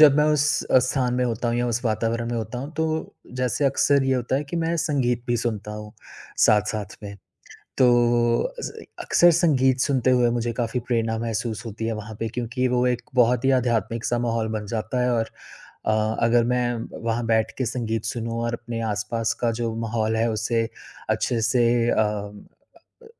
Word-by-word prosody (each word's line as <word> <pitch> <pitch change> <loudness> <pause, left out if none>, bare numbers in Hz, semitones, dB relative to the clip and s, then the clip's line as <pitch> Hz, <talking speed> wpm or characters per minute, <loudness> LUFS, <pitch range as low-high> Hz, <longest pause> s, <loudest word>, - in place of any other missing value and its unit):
जब 145 -2 +8
मैं 150 - +4
उस 150 0 +2
अ, 130 - +4
स्थान 125 0 0
में 125 0 +1
होता 120 0 -1
हूँ 115 - 0
या 120 - 0
उस 120 +1 -2
वातावरण 115 +1 -1
में 120 - -2
होता 115 +2 -4
हूँ, 140 +4 -6
तो 160 0 -2 0.2
जैसे 125 +3 0
अक्सर 140 +1 +3
ये 135 0 +2
होता 125 +1 0
है 145 - -2
कि 170 - -2
मैं 165 0 0
संगीत 125 -6 0
भी 120 - +1
सुनता 110 -3 -3
हूँ 105 0 -8 0.5
साथ-साथ 105 -2 +1
में। 100 -1 -7 0.6
तो 130 - +5
वो 120 -1 +3 0.2
अस - - -4
अ, - - -10 0.2
अक्सर 175 0 +5
संगीत 130 -4 +3
सुनते 130 -3 +2
हुए 125 -1 +4
मुझे 115 0 -2
काफ़ी 115 +1 -1
प्रेरणा 115 -2 0
महसूस 115 -1 -3
होती 110 0 -5
है 115 - -1
वहाँ 110 +1 -9
पे 115 - -1
क्योंकि 120 +2 -2
वो 125 0 +1
एक 125 -1 0
बहुत 125 +1 +3
ही 135 - +4
आध्यात्मिक-सा 115 0 -1
माहौल 115 -1 0
बन 105 - -6
जाता 115 +3 -1
है। 125 - +2
और 115 -1 0 0.6
अ, 110 0 +1
अगर 120 0 +4
मैं 120 -1 +1 0.3
वहाँ 115 +1 -1
बैठ 110 -1 +1
के 130 - 0
संगीत 115 -2 -2
सुनूँ 115 0 -3
और 120 0 -1
अपने 120 -1 -5
आसपास 105 +3 -1
का 120 - +2
जो 115 -1 -1
माहौल 110 0 0
है, 115 +1 +2
उसे 115 +1 0 0.4
अच्छे 115 -2 0
से 120 +2 +2 0.3
अ, - - +2
अ - - +5 1.0
अ 460 - -16
120 Hz, 195 wpm, -24 LUFS, 115-125 Hz, 1.0 s, जब